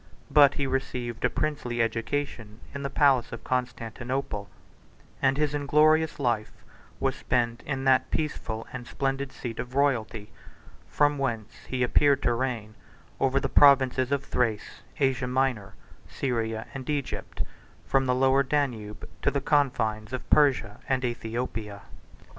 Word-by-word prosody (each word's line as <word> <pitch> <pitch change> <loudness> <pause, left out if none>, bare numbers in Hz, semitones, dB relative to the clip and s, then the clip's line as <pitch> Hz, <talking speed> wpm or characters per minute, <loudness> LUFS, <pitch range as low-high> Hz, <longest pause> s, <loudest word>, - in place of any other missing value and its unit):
But 145 -2 +6
he 140 - -1
received 130 -3 -3
a - - +4
princely 145 -6 -2
education 115 -1 -2
in 140 - -5
the 140 - -2
palace 135 -3 +3
of 115 - -7
Constantinople; 125 -2 -3 0.7
and 135 0 +3
his 150 -1 +1
inglorious 155 +2 +3
life 120 -5 0 0.5
was - - 0
spent 120 -1 -1
in 135 -2 -2
that 130 -1 +3
peaceful 115 -7 -3
and 120 -2 -7
splendid 135 0 -2
seat 115 -3 -7
of 125 +2 -6
royalty, 115 -6 0 0.6
from 145 -1 +2
whence 115 -6 -4
he 130 -1 -1
appeared 140 +3 +3
to 120 - +3
reign 115 -3 -3 0.5
over 135 0 +2
the - - -1
provinces 130 -2 +5
of 140 -1 +1
Thrace, 115 -4 -2 0.2
Asia 135 -2 +1
Minor, 125 -5 -1 0.3
Syria, 115 -4 -2
and 135 -1 -7
Egypt, 145 -3 -3 0.4
from 135 -1 +1
the 125 - +2
Lower 135 +1 +4
Danube 125 -7 -2
to - - +3
the 140 - -1
confines 125 -6 0
of 130 - -5
Persia 130 -8 +3
and 130 -1 +1
Æthiopia. 115 -3 -4
130 Hz, 140 wpm, -27 LUFS, 115-140 Hz, 0.7 s, But